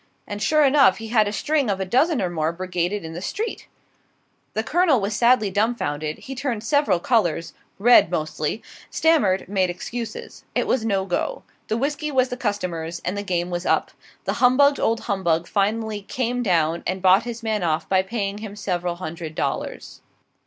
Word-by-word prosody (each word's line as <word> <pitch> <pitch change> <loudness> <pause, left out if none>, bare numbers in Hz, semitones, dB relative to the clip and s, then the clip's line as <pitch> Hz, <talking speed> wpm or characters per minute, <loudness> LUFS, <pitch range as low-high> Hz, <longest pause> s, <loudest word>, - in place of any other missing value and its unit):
And, 205 0 -6
sure 305 +4 +3
enough, 275 -7 +5
he 225 0 -7
had 215 -2 +3
a - - -1
string 290 +3 0
of 195 -1 0
a 190 - -1
dozen 260 - +2
or 180 - 0
more 160 -1 0
brigaded 180 +1 -2
in 160 - -7
the 175 - -6
street. 440 - -4 0.9
The 220 - 0
Colonel 320 -1 +3
was 205 +1 -2
sadly 235 -3 +3
dumbfounded; 155 -8 -1
he 270 - -8
turned 245 -5 -3
several 285 - +2
colors 175 -6 0 0.2
red 235 -4 +6
mostly 155 +3 -2 0.3
stammered, 285 - +2
made 190 -1 +1
excuses. 235 - -6
It - - +1
was 255 - +1
no 195 -4 0
go, 350 - -2 0.2
the 220 - -1
whisky 295 +4 -2
was 260 -2 +2
the - - -3
customer's, 175 -7 -3
and 180 - -1
the 205 - -2
game 180 -3 -2
was 175 0 -3
up. - - +1 0.3
The - - 0
humbugged 280 +3 +5
old 225 0 +1
humbug 175 -5 0
finally 215 +1 -1
"came 245 +4 -2
down," 170 -6 +1
and 185 +1 -3
bought 190 +2 +6
his 235 0 -7
man 215 -2 -1
off 160 -2 0
by 190 -1 +3
paying 200 0 -3
him 210 -2 -7
several 180 -4 -2
hundred 160 -2 -7
dollars. - - -4
205 Hz, 180 wpm, -23 LUFS, 180-245 Hz, 0.9 s, red